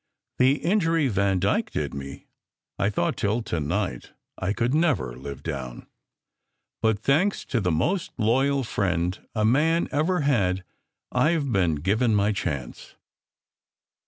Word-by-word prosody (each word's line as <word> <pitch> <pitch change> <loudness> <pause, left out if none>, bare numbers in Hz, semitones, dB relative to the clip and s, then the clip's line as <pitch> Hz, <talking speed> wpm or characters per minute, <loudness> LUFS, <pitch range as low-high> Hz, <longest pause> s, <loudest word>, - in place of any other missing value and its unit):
The 130 +2 +5
injury 165 -5 +2
Vandyke 100 -2 +1
did - - -3
me, 70 0 -8 0.5
I 100 - +2
thought 100 -4 0
till 110 +3 0
to 85 - -2
night 85 - -3 0.2
I 95 +1 -2
could 115 +4 0
never 145 - +1
live 70 +1 -8
down. 65 -6 -5 1.0
But 110 -2 +2
thanks 155 - +1
to 125 -6 -1
the 90 - 0
most 95 - 0
loyal 135 +5 +2
friend 90 -5 -1 0.2
a 105 -1 +2
man 160 +8 +3
ever 160 +4 +1
had 95 -10 +1 0.5
I 165 +2 +3
ve 145 -3 -2
been 90 -6 +2
given 105 +9 +1
my 105 +1 +2
chance." 75 - -5
105 Hz, 135 wpm, -25 LUFS, 90-140 Hz, 1.0 s, The